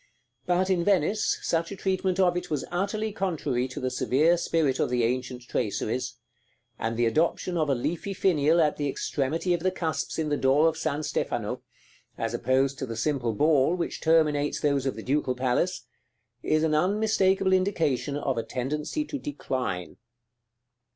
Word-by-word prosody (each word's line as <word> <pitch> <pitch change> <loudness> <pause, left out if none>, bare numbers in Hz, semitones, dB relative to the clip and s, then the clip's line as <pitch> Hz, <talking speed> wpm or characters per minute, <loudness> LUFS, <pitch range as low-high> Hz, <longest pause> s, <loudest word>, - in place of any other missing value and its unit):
But 180 +2 +2
in 175 -2 +2
Venice, 200 +2 +2
such 165 +1 0
a - - -4
treatment 190 0 -1
of 180 -2 +4
it 180 0 -3
was 150 -3 -2
utterly 200 +4 -1
contrary 150 - -1
to 130 - -7
the 130 0 -2
severe 150 +6 +3
spirit 160 -5 0
of - - +1
the 125 -1 +1
ancient 125 +1 -2
traceries; 125 +2 -2 0.6
and 115 0 -2
the 120 - +2
adoption 165 +7 +1
of 155 -3 +1
a 135 - +3
leafy 175 +10 -3
finial 165 -3 +3
at 150 -2 +2
the 145 -1 -1
extremity 155 +6 -1
of 175 - 0
the 185 +3 +1
cusps 165 -4 -3
in 160 -2 -1
the 145 - +1
door 140 +4 +4
of 160 - +1
San 150 -1 -2
Stefano, 150 - -2 0.6
as 115 0 -2
opposed 135 +3 +1
to 130 - -3
the 115 -1 -5
simple 120 -1 0
ball 150 +5 +3
which 175 - -4
terminates 150 -3 +2
those 140 -3 +1
of 135 - -1
the - - -7
Ducal 135 -1 0
Palace, 130 +8 0 0.6
is 155 0 +1
an 160 -1 +2
unmistakable 190 +2 +2
indication 155 -8 +1
of 135 -4 -1
a - - -2
tendency 150 - -3
to 290 -2 -5
decline. 130 - -4
150 Hz, 170 wpm, -27 LUFS, 130-180 Hz, 0.6 s, of